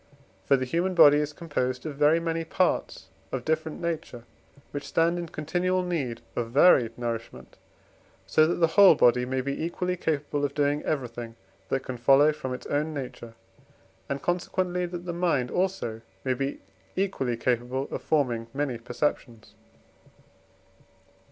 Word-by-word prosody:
For 140 - +4
the 130 - -2
human 175 +7 -1
body 150 -3 +8
is 150 0 -1
composed 130 -5 -3
of 155 - -4
very 150 +3 +4
many 165 0 -2
parts 160 - -1 0.2
of 130 -2 -4
different 160 0 -1
nature, 160 -8 -4 0.5
which 145 -1 -5
stand 170 +1 +2
in 170 - -4
continual 180 +5 -1
need 150 -10 -3
of 115 -1 -2
varied 125 -4 +5
nourishment, 115 -2 -5 0.7
so 155 0 +4
that 170 - 0
the 170 - +3
whole 200 -4 +8
body 125 -1 +4
may 130 0 -1
be 140 +3 -3
equally 180 +2 -2
capable 145 -4 -2
of 140 -1 -1
doing 145 0 +1
everything 120 -5 -3 0.3
that 135 - 0
can 130 -2 -6
follow 135 +5 +5
from 150 -4 -6
its 125 - -6
own 150 +2 -1
nature, 125 -4 -7 0.7
and 140 0 -3
consequently 180 0 -1
that 175 0 -7
the 175 - -3
mind 165 -8 0
also 180 -12 -1 0.2
may 130 - +1
be 135 +2 -3 0.3
equally 160 -11 -1
capable 125 +3 -1
of - - -4
forming 125 -7 0
many 135 -5 -2
perceptions. 120 -2 -3
145 Hz, 150 wpm, -27 LUFS, 125-170 Hz, 0.7 s, body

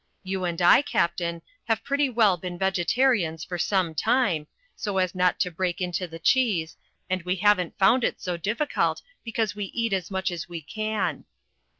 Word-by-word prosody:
You 190 -1 -2
and 170 -1 -2
I, 175 - +7
Captain, 170 -9 -1 0.2
have 225 -1 0
pretty 280 0 +1
well 220 -6 +4
been 175 0 -6
vegetarians 190 -2 +1
for 175 -1 -5
some 185 -4 +1
time, 170 - +1 0.3
so 200 -2 -3
as 185 -1 +1
not 180 -1 +1
to 180 - 0
break 180 +2 -2
into 180 0 -2
the 165 0 -9
cheese, 185 -5 +1 0.3
and 185 0 -1
we 180 +2 -1
haven't 190 -2 +2
found 230 +6 +4
it - - 0
so 180 -2 -3
difficult, 215 - -1 0.2
because 225 -2 -2
we 205 -1 -3
eat 230 +2 -2
as 185 -3 -1
much 190 -1 -1
as 175 -1 -6
we 170 -1 -5
can." 215 +7 -3
185 Hz, 180 wpm, -26 LUFS, 175-215 Hz, 0.3 s, I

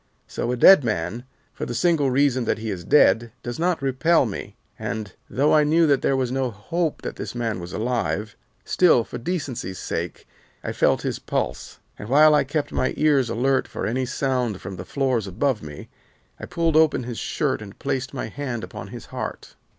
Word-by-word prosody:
So 120 - -3
a 125 - -1
dead 190 +4 +8
man, 110 +2 -2 0.3
for - - -5
the 120 - -4
single 150 0 +2
reason 130 -2 +2
that - - 0
he 110 0 -4
is 90 -3 -5
dead, 120 -3 +4
does 120 +4 -5
not 170 -3 0
repel 140 +4 +3
me, 105 - -6 0.2
and, 110 -4 -4 0.2
though 145 +3 +2
I 150 - +6
knew 160 +3 +4
that 140 -3 +3
there 135 - +1
was 130 -2 -1
no 130 -1 0
hope 155 - -3
that - - -5
this - - -6
man 115 -4 -2
was 90 0 -7
alive, 110 -4 -2 0.3
still 170 -10 +4
for 120 - -7
decency's 125 - -4
sake, - - -5 0.4
I - - -3
felt - - +2
his - - -2
pulse, - - -3 0.2
and 105 - -7
while 150 +3 +6
I 150 - +4
kept 145 +2 -2
my 130 - 0
ears 145 -5 +3
alert 130 +3 +1
for - - -5
any 130 +3 -1
sound 125 -5 -1
from 95 0 -7
the 90 - -7
floors 130 -5 0
above 120 +6 0
me, 75 -1 -9 0.5
I - - -7
pulled 165 -2 0
open 155 -4 +4
his 120 -1 -5
shirt 140 -7 -1
and 100 -2 -10
placed 135 -1 -2
my 135 - -4
hand 130 -5 -5
upon - - -8
his - - -9
heart. - - -6
130 Hz, 195 wpm, -23 LUFS, 115-145 Hz, 0.5 s, dead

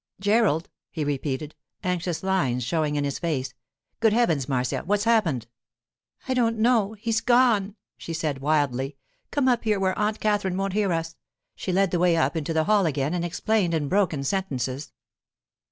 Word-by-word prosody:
'Gerald!' 205 -5 +2 0.2
he 160 - -3
repeated, 145 +1 -3 0.3
anxious 180 -2 -2
lines 140 -11 +1
showing 150 +3 0
in 145 - 0
his 140 -1 -2
face. 140 -6 -2 0.5
'Good 225 -2 +3
heavens, 165 - +1
Marcia! 125 -2 0
What's 205 +2 +1
happened?' 195 - +2 0.8
'I 260 - +1
don't 230 -3 +1
know; 220 -2 +2
he's 220 +1 -1
gone,' 235 -5 +3 0.2
she - - -7
said 155 -4 -2
wildly. 140 -2 0 0.3
'Come 285 -3 +1
up 245 -2 +2
here, 215 -3 +1
where 190 -1 +1
Aunt 210 +1 0
Katherine 205 -3 0
won't 195 0 -1
hear 205 -2 +1
us.' 165 -1 -3 0.4
She 185 - -4
led 195 0 +2
the 175 - +1
way 175 -1 +3
up 165 - +1
into 160 0 -2
the 160 -1 +2
hall 200 +1 +3
again 145 +1 -1
and 175 -1 -1
explained 175 +1 0
in 150 -3 -1
broken 180 -8 +1
sentences. 140 -6 -2
175 Hz, 170 wpm, -25 LUFS, 145-210 Hz, 0.8 s, Good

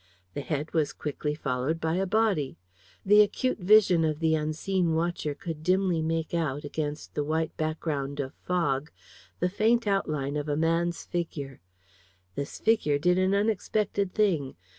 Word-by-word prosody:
The - - -3
head 150 +1 -3
was 155 -3 +1
quickly 150 0 -3
followed 140 +2 -1
by 160 0 -1
a 190 +2 0
body. 200 -9 +1 0.5
The 210 +2 +7
acute 215 +4 +1
vision 185 -3 +5
of 155 -1 0
the 160 -1 +2
unseen 160 +3 0
watcher 165 -3 -1
could 160 0 -6
dimly 180 0 +2
make 160 0 -2
out, 150 -4 -1
against 150 0 -4
the 145 - -1
white 160 +2 -1
background 150 -3 -2
of 135 0 -3
fog, 150 -5 -1 0.5
the 180 - +2
faint 220 +5 +2
outline 150 -8 0
of 150 0 -3
a 145 - 0
man's 165 +2 0
figure. 145 - -4 0.7
This 140 +8 -5
figure 215 -10 +2
did 180 +5 +2
an 190 +1 +2
unexpected 205 -1 0
thing. 175 -11 +1
160 Hz, 155 wpm, -28 LUFS, 150-185 Hz, 0.7 s, The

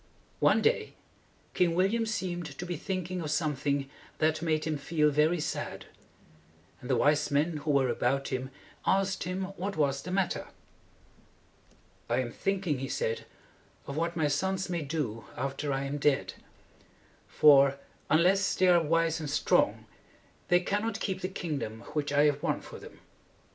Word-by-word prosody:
"] - - -35
One - - +2
day 470 - +1 0.6
King 170 -2 +2
Wil 185 +2 +3
liam 230 +1 0
seemed 175 -6 -3
to 180 - -5
be 175 -1 -3
thinking 185 +1 -3
of 155 - -4
something 145 -2 0 0.3
that 155 0 +1
made 155 -2 0
him 155 -2 -2
feel 150 0 +2
very 155 +4 +2
sad; 150 - -4 1.0
and 125 - -9
the 130 - +3
wise 145 +5 +3
men 150 +3 +1
who 150 +1 -5
were 140 -2 +3
about 125 +3 0
him 130 0 -3 0.3
asked 190 -1 +1
him 185 +2 -2
what 195 +1 -3
was 140 -2 +1
the 180 - -8
matter. 185 -1 -1 1.6
"I 120 - +1
am 125 -2 -1
thinking," 185 -6 -1
he 135 - -3
said, 115 - -2 0.6
"of 140 - -6
what 165 +2 -1
my 160 -3 +1
sons 190 +6 -1
may 170 -2 -1
do 135 -8 -3
after 140 +2 -2
I 135 0 -1
am 140 +1 -3
dead. 145 -1 +1 0.9
For, 140 -2 +6 0.3
unless 185 +5 +3
they 185 -1 +4
are 175 -1 +6
wise 165 +1 +1
and 155 -2 -4
strong, 145 - +2 0.6
they 175 0 +4
cannot 205 +4 -1
keep 190 -3 -3
the 185 - -1
kingdom 145 - -4
which 145 -1 -1
I 145 0 +4
have 145 -1 +2
won - - -1
for - - -10
them. - - -13
155 Hz, 165 wpm, -29 LUFS, 140-180 Hz, 1.6 s, For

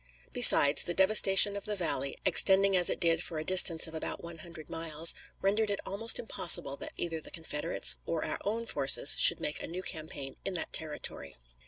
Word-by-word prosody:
Besides, 145 +1 +5
the 175 - -6
devastation 195 0 +3
of 200 - -9
the 210 - -3
valley, 140 -7 -4
extending 195 0 +2
as 180 -1 +1
it - - -5
did 165 -2 -2
for 165 - -7
a 155 - -6
distance 175 -3 +3
of 160 - -12
about 160 - -7
one 170 -1 -13
hundred 160 -1 -14
miles, 165 0 0 0.3
rendered 210 +2 -2
it 200 - -5
almost 225 +4 +2
impossible 170 - +1
that - - -9
either 165 -2 -6
the - - -11
Confederates 160 -1 -1
or 165 -2 -5
our - - -7
own 225 +3 -6
forces 140 -5 +3
should - - +8
make 150 - -7
a - - -8
new 180 +3 -9
campaign 155 -5 -8
in 190 - -7
that 165 - -6
territory. 150 - -6
170 Hz, 195 wpm, -27 LUFS, 155-195 Hz, 0.3 s, should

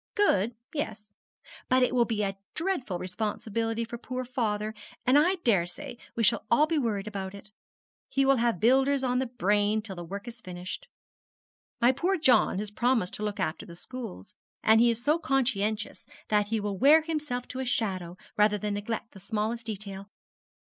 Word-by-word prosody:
'Good, 235 - +3 0.2
yes; 215 -8 -4 0.6
but 255 0 +5
it 250 - +2
will 240 -2 +4
be 220 -3 -1
a 195 -1 -1 0.2
dreadful 320 - -1
responsibility 220 +4 -2
for 235 +1 -7
poor 255 +1 -4
father, 215 -4 -1 0.3
and 255 - +4
I 335 +6 +5
daresay 175 -2 0 0.2
we 230 - 0
shall 225 +2 +3
all 290 +6 +5
be 315 -1 0
worried 210 -6 -1
about 200 -2 -5
it. 210 +1 -13 0.6
He 275 0 +2
will 270 0 +5
have 235 -5 +1
builders 265 +4 +4
on 250 -1 +1
the 260 - 0
brain 210 -2 +2
till 200 -3 -7
the 175 - -6
work 200 +6 -7
is 235 0 -8
finished. 180 -1 -7 0.9
My 240 +2 +6
poor 360 +9 0
John 255 - +4
has 205 +1 -3
promised 235 -3 +1
to 215 - -4
look 210 -1 -3
after 175 -1 -1
the 170 - -10
schools; 215 - -8 0.3
and 220 +1 +6
he 240 - +6
is 235 +1 -1
so 300 +4 +3
conscientious 220 -7 -1 0.2
that 210 -1 +3
he 225 +1 0
will 205 -2 -3
wear 305 +4 +7
himself 300 -6 -3
to 255 - -5
a - - -1
shadow 185 -7 -2 0.2
rather 210 0 +4
than 210 +1 -2
neglect 220 +2 -4
the 195 - -13
smallest 220 +3 -2
detail.' 200 -2 -6
225 Hz, 185 wpm, -28 LUFS, 205-255 Hz, 0.9 s, wear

